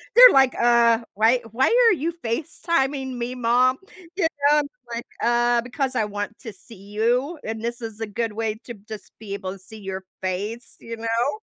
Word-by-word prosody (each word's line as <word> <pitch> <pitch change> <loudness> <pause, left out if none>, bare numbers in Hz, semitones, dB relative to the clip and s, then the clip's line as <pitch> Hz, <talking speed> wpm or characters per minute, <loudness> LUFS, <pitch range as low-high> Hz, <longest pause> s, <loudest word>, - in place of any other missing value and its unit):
They're - - +11
like, 265 -1 +5
"Uh, 235 -1 +5
why 225 +4 +3
why 260 +3 +2 0.2
are - - +5
you 335 +1 -2
FaceTiming 270 +1 -1
me, 240 +1 -3
mom?" 250 +2 +3 0.4
You 385 - -1
know, 295 -2 +2
I'm - - 0
just 250 -8 -10
like, 235 - -5 0.2
"Uh, 240 0 +3
because 255 +2 -3
I 220 - +2
want 205 +1 -5
to 225 -4 -8
see 225 +4 -15
you 235 - -1
and 220 0 -5
this 235 +1 -4
is 225 -1 -7
a 225 - -2
good 225 +1 -3
way 220 -1 -2
to 240 - -7
just 210 -2 -9
be 210 -2 -7
able 195 -1 -5
see 215 +4 -12
your 190 -1 -6 0.2
face," 205 +6 -4
you 230 0 -7
know? 230 +4 0
235 Hz, 195 wpm, -23 LUFS, 220-260 Hz, 0.4 s, They're